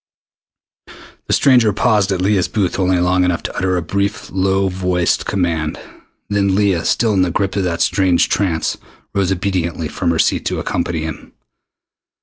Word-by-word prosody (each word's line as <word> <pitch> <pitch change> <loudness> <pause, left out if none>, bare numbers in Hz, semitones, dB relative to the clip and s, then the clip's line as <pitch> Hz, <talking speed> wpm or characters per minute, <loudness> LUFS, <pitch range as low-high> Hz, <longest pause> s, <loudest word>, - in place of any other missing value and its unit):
The - - 0
stranger 125 -6 +4
paused 105 -2 +2
at 95 -1 -1
Leah's 95 -1 +2
booth 100 -4 -1
only 95 -1 +2
long 90 +1 +2
enough 90 -2 0
to - - -5
utter 95 0 0
a 85 - -2
brief 100 +5 -2
low 95 +1 +1
voiced 90 -2 0
command. 85 -5 -1 0.5
Then 100 -2 +1
Leah, 100 -4 +1
still 115 -3 +2
in 95 - +2
the 90 - +2
grip 95 +3 -1
of 100 -2 0
that 85 -1 0
strange 95 -3 +2
trance, 85 -6 -1 0.3
rose 95 -2 0
obediently 85 -4 -2
from - - -2
her 85 - +1
seat - - +1
to - - -2
accompany 85 -2 -2
him. 80 -1 -7
95 Hz, 165 wpm, -17 LUFS, 85-100 Hz, 0.5 s, stranger